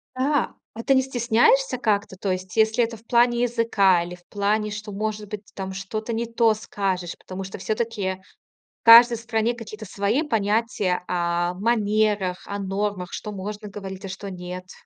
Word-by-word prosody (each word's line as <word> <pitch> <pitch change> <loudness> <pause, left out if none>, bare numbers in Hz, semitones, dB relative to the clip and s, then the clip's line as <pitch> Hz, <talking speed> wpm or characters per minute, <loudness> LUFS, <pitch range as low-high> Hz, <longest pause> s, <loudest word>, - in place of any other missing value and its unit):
Да, 275 +1 +1 0.2
а 230 - -7
ты 270 +1 +3
не 260 - +5
стесняешься 255 +1 +2
как-то? 205 -5 0
То 190 0 -2
есть, 185 0 -4
если 220 +2 +4
это 230 0 -3
в 220 - -22
плане 240 0 +3
языка 220 -7 +3
или 175 +1 -7
в 175 - -23
плане, 210 +1 0
что, 210 0 -6
может 210 0 -3
быть, 210 0 -6
ты - - -21
там 190 -1 -5
что-то 215 +4 -4
не 230 +1 -1
то 230 -1 +3
скажешь. 190 -4 -3
Потому 190 +1 -7
что 190 - -7
всё-таки 200 -2 -2 0.6
в - - -64
каждой 235 +1 +9
стране 225 0 0
какие-то 220 -2 -9
свои 205 +8 0
понятия, 215 - 0
а, 175 0 0
манерах, 210 -3 +1
о 200 0 -4
нормах, 195 -1 -2
что 210 - -5
можно 210 +2 -6
говорить, 195 -1 -7
а - - -6
что 195 +1 -6
нет. 180 0 -7
210 Hz, 180 wpm, -24 LUFS, 190-230 Hz, 0.6 s, каждой